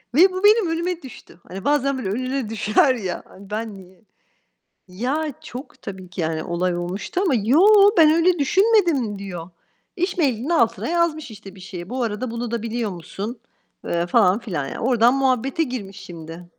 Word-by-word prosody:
ve 370 +4 +7
bu 370 +2 -4
benim 420 -3 +5
önüme 340 +1 -2
düştü. 245 -8 -13
Hani 190 +1 -8
bazen 275 -2 +2
böyle 220 -7 -3
önüne 255 +2 -2
düşer 220 +5 +2
ya. 190 -6 -4
Hani, 195 +1 -15
ben 215 -1 -4
niye? 185 +1 -16 0.9
Ya, 270 +11 -2
çok 255 +4 -10
Tabii 185 -2 -8
ki 180 -1 -5
yani 160 0 -2
olay 175 +1 -1
olmuştu 180 - -3
ama 360 -8 +2
"Yo, 385 - +6
ben 315 -2 +7
öyle 345 0 +3
düşünmedim." 335 - +2
diyor. 180 -4 -7 0.5
İş 360 +1 -2
mail'inin 265 -4 0
altına 240 -10 +1
yazmış 320 -6 0
işte 200 -2 -12
bir 190 - -14
şey. 180 -1 -8
"Bu 255 0 -2
arada 225 +2 -3
bunu 235 0 -4
da 235 - -2
biliyor 230 -2 -2
musun?" 200 +6 -7 0.5
eee, 170 0 -1
falan 185 +3 +4
filan 170 - -4
yani. - - -6
Oradan 240 0 +3
muhabbete 270 +2 +1
girmiş 205 -8 -6
şimdi. 165 0 -10
235 Hz, 175 wpm, -22 LUFS, 190-300 Hz, 0.9 s, ve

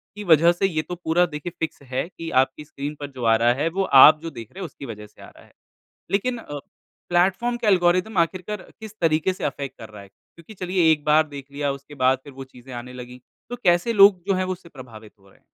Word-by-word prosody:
की 210 - -7
वजह 170 -1 +5
से 175 +3 -1
ये 155 -4 -1
तो 180 - -7
पूरा 175 0 +1
देखिए 155 +1 -6
फ़िक्स 160 -3 -4
है 130 +6 -2
कि 165 -2 -8
आपकी 135 +3 -10
स्क्रीन 145 0 -6
पर 145 - -4
जो 125 -2 -8
आ 115 0 +5
रहा 120 +2 +3
है, 145 +6 -1
वो 190 +3 -1
आप 150 0 +8
जो 165 - -5
देख 115 -8 -10
रहे 190 - -12
हैं, - - -3
उसकी 140 -3 -10
वजह 105 -3 -9
से - - -21
आ - - -12
रहा - - -19
है। - - -25 0.6
लेकिन 240 +5 0
अ, 145 -9 -7 0.5
प्लेटफ़ॉर्म 195 +8 +1
के 235 -3 -3
एल्गोरिदम 185 +2 +2
आख़िरकार 185 +4 -2 0.2
किस 220 -1 -10
तरीके 160 +3 +2
से - - -9
अफ़ेक्ट 140 -1 -5
कर 110 - -10
रहा 105 -1 -12
है? 100 - -15
क्योंकि 170 - -18
चलिए, 180 -4 +1
एक 150 -2 0
बार 155 +1 +4
देख 140 -1 -10
लिया, 145 0 -2
उसके 140 +2 -10
बाद 130 0 +3
फिर 140 - -12
वो 135 0 -8
चीज़ें 130 0 -14
आने 125 +1 -8
लगी। 125 0 -10 0.3
तो 245 - -4
कैसे 175 +6 +2
लोग 195 -3 +6
जो 195 - +2
हैं, 185 0 0
वो 185 - -3
उससे 180 -2 -14
प्रभावित 115 -6 -13
हो 95 - -23
रहे - - -24
हैं? - - -39
155 Hz, 255 wpm, -23 LUFS, 135-180 Hz, 0.6 s, आप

